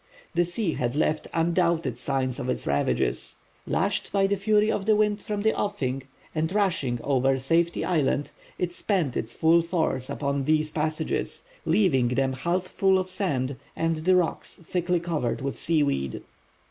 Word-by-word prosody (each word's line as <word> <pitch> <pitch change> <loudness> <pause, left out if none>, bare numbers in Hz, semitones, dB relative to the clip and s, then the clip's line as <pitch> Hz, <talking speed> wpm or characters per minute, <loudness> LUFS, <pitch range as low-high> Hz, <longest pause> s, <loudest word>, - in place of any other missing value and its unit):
The 175 0 +3
sea 175 0 -1
had 120 +1 -2
left 155 +1 0
undoubted 165 -5 +1
signs 130 0 -2
of 130 -2 -3
its - - -2
ravages. 70 -3 0 0.3
Lashed - - 0
by 195 0 +3
the 200 +1 +2
fury 210 +2 +2
of 195 - -2
the 215 - +5
wind 210 0 +1
from 205 -1 -3
the 220 - +3
offing, 135 -11 -2 0.3
and 160 +1 -1
rushing 175 - 0
over 135 -1 +2
Safety 165 +6 +1
Island, 145 -4 +1 0.3
it 175 -1 -2
spent 175 - 0
its 110 - -3
full 165 +1 +4
force 165 -6 -1
upon 140 -1 -1
these 155 0 +2
passages, 155 0 -2 0.2
leaving 140 - +3
them 130 +2 +1
half 170 +7 -1
full 190 +1 +2
of 185 0 -2
sand 140 -10 -1 0.2
and 165 0 0
the 180 +4 +3
rocks 180 -3 0
thickly 175 +1 -1
covered 160 -8 -2
with 135 -4 -3
seaweed. 140 - 0
160 Hz, 160 wpm, -26 LUFS, 135-185 Hz, 0.3 s, the